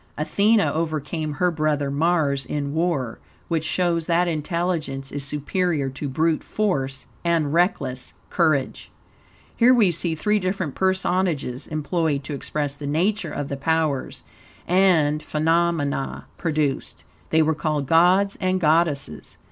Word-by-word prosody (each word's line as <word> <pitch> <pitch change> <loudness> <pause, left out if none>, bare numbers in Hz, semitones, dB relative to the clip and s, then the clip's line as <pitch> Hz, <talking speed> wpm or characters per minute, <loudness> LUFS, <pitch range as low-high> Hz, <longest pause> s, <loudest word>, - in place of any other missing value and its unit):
Athene 200 +9 +3
overcame 155 -3 -1
her 180 +4 +1
brother 150 -3 0
Mars 145 -2 +1
in 145 0 -3
war, 160 -8 -1 0.3
which 165 -2 0
shows 170 -1 0
that 175 +1 +2
intelligence 160 -4 -2
is 145 -1 -4
superior 150 +1 -1
to 140 +2 -5
brute 160 +4 +1
force 135 -11 -2 0.2
and 165 -4 +1
reckless 140 -7 0 0.2
courage. 155 -6 0 0.7
Here, 250 +2 +5
we 210 -7 +4
see 170 0 -1
three 210 +6 +1
different 185 -5 -2
personages 180 -8 0
employed 155 -1 -1
to 145 - -5
express 145 0 -3
the 145 0 -6
nature 175 +4 0
of 145 -1 -4
the 140 - -4
powers 155 -1 -1 0.4
and 170 -5 +3
phenomena 155 -3 0
produced. 155 -5 -2 0.3
They 160 0 +4
were 160 +1 +2
called 150 -2 -1
gods 180 +6 +4
and 185 0 +1
goddesses. 155 - 0
160 Hz, 130 wpm, -23 LUFS, 145-175 Hz, 0.7 s, Here